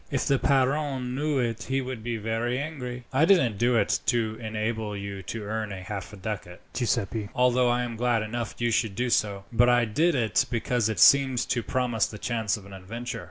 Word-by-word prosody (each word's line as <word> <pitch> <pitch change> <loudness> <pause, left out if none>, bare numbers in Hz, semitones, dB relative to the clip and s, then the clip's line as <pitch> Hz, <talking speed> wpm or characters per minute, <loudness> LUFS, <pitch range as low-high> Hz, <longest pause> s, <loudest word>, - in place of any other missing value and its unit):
If 135 - -1
the 135 -1 +2
padrone 135 -1 +1
knew 145 +2 0
it 115 -3 -1
he 135 +1 +1
would 130 -4 -5
be 120 -1 -2
very 115 +3 -1
angry." 130 -4 -5
"I 135 +4 +4
didn't 160 - +4
do 120 +1 +3
it 115 - +2
to 115 -2 +1
enable 110 -1 -3
you 100 -1 -6
to 110 +3 -6
earn 110 +1 -3
half 100 +1 -6
a 105 - -10
ducat, 95 -3 -6
Giuseppi, 110 -3 -1
although 125 0 +3
I 120 +1 +1
am 120 -2 -5
glad 120 -2 +1
enough 115 +2 -4
you 120 0 0
should 110 -3 0
do 125 +3 -1
so; 100 -3 +1
but 120 +2 +5
I 120 -1 +4
did 155 +10 +2
it 110 -7 +1
because 120 -1 0
it 110 -5 -2
seemed 135 +2 +6
to 120 - +1
promise 120 -1 0
the 105 - -9
chance 110 -3 -1
of 100 - -13
an 100 - -12
adventure. 110 +6 -6
120 Hz, 205 wpm, -26 LUFS, 110-125 Hz, -, seemed